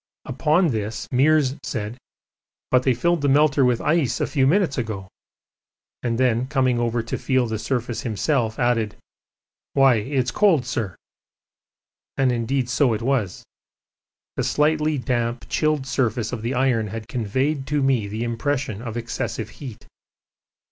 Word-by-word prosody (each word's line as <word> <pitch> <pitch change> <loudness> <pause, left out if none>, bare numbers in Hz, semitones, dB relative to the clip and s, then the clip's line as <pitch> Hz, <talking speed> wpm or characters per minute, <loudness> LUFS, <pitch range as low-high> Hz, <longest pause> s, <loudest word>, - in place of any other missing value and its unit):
Upon 160 +3 +2
this 110 -2 -3
Meares 140 +1 +3
said, 110 -1 -4 0.8
'But 125 - +5
they 130 -1 +2
filled 170 +5 +1
the 145 - +2
melter 145 0 +4
with 125 -2 +2
ice 150 -5 +1
a - - +1
few 135 -3 +1
minutes 170 -3 +2
ago,' 105 -5 -4 0.9
and 115 -2 -1
then, 125 -1 +2
coming 130 -4 +1
over 120 -1 0
to 115 - -4
feel 130 -2 +1
the 110 -2 -3
surface 120 -1 -2
himself, 115 0 -1
added, 115 -3 +1 0.8
'Why, 135 -3 +5
it's 125 +3 -1
cold, 170 -10 +3
sir.' 115 -7 -3 1.2
And 135 -2 +3
indeed 125 +2 -1
so 125 0 +2
it 110 - -5
was. 120 -8 -1 0.9
The - - 0
slightly 150 0 +1
damp 120 -2 -2
chilled 155 -3 +1
surface 120 -3 -1
of 115 - -4
the 120 +4 -2
iron 125 -4 +1
had 110 +2 -6
conveyed 130 +5 -1
to 145 -1 0
me 130 -6 +2
the 110 +3 -4
impression 120 -1 -2
of 115 -1 -5
excessive 115 -1 -4
heat. 120 -5 -8
125 Hz, 150 wpm, -23 LUFS, 115-140 Hz, 1.2 s, But